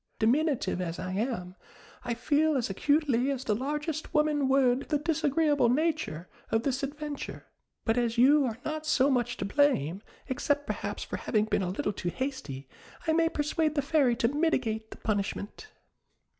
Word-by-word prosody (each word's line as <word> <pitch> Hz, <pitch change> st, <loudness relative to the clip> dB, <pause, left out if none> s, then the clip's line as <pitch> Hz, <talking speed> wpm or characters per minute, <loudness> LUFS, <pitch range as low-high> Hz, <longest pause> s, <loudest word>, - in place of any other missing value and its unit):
Diminutive 245 Hz, -, +1 dB
as 170 Hz, -2 st, -3 dB
I 185 Hz, -, -4 dB
am, 190 Hz, -3 st, -2 dB, 0.5 s
I 240 Hz, -1 st, -2 dB
feel 295 Hz, +5 st, +2 dB
as 235 Hz, -6 st, -1 dB
acutely 280 Hz, +2 st, +2 dB
as 265 Hz, -2 st, -2 dB
the 220 Hz, -, +1 dB
largest 295 Hz, +7 st, -3 dB
woman 300 Hz, -3 st, +2 dB
would 265 Hz, -1 st, +3 dB
the 300 Hz, -, +2 dB
disagreeable 295 Hz, -3 st, +2 dB
nature 285 Hz, -, 0 dB, 0.2 s
of 225 Hz, 0 st, +1 dB
this 265 Hz, 0 st, -1 dB
adventure; 290 Hz, +1 st, -5 dB, 0.4 s
but 225 Hz, +1 st, +2 dB
as 235 Hz, -1 st, -1 dB
you 280 Hz, +4 st, +6 dB
are 230 Hz, -3 st, -3 dB
not 310 Hz, 0 st, -3 dB
so 280 Hz, -2 st, +3 dB
much 245 Hz, -2 st, 0 dB
to -, -, -3 dB
blame, 200 Hz, -, +2 dB, 0.3 s
except 285 Hz, +2 st, 0 dB
perhaps -, -, -4 dB
for -, -, -5 dB
having 215 Hz, -2 st, +1 dB
been 210 Hz, -2 st, 0 dB
a 180 Hz, -, -1 dB
little 205 Hz, +2 st, -2 dB
too 180 Hz, -2 st, -3 dB
hasty, 255 Hz, -, -5 dB, 0.4 s
I 320 Hz, -, +2 dB
may 330 Hz, 0 st, +3 dB
persuade 310 Hz, 0 st, 0 dB
the 285 Hz, -, +1 dB
Fairy 280 Hz, -5 st, +3 dB
to 230 Hz, -, +2 dB
mitigate 255 Hz, -7 st, 0 dB
the -, -, -10 dB
punishment." 205 Hz, -, -3 dB
265 Hz, 170 wpm, -29 LUFS, 220-300 Hz, 0.5 s, you